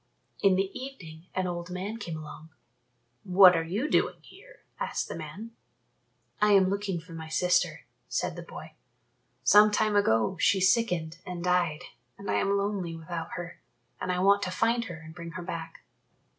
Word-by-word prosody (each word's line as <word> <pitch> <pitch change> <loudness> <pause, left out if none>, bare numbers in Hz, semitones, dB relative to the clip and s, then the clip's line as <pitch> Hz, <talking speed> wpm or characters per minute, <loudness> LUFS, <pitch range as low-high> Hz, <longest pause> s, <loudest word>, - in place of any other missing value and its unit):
In 195 -2 +5
the 195 +1 0
evening 180 -12 -9
an 185 - 0
old 175 -1 -4
man 190 +5 -4
came 170 -8 -5
along. 155 +1 -10 0.7
"What 185 -1 +7
are 165 - +1
you 200 - -2
doing - - +1
here?" - - -17 0.2
asked - - -2
the - - -6
man. 165 +8 -8 0.9
"I 210 0 +5
am 190 -1 +5
looking 200 -3 -2
for 165 +1 -13
my 160 -1 -7
sister," 180 +3 +1 0.3
said - - -1
the - - -6
boy; - - -10 0.7
"some 210 +9 +7
time 210 0 +1
ago 185 - +2
she 200 0 +3
sickened 180 -5 +1
and 175 -1 -6
died 180 -4 +1 0.3
and 200 - -4
I - - +2
am 200 0 +1
lonely 200 -4 -2
without 165 0 -6
her, 175 0 -7 0.4
and 185 - -2
I 180 - -1
want 200 +2 +4
to 185 - -2
find 230 +5 +1
her 175 -6 -7
and 160 0 -12
bring 170 -1 -8
her 180 - -6
back." 165 -2 -7
180 Hz, 175 wpm, -28 LUFS, 165-200 Hz, 0.9 s, What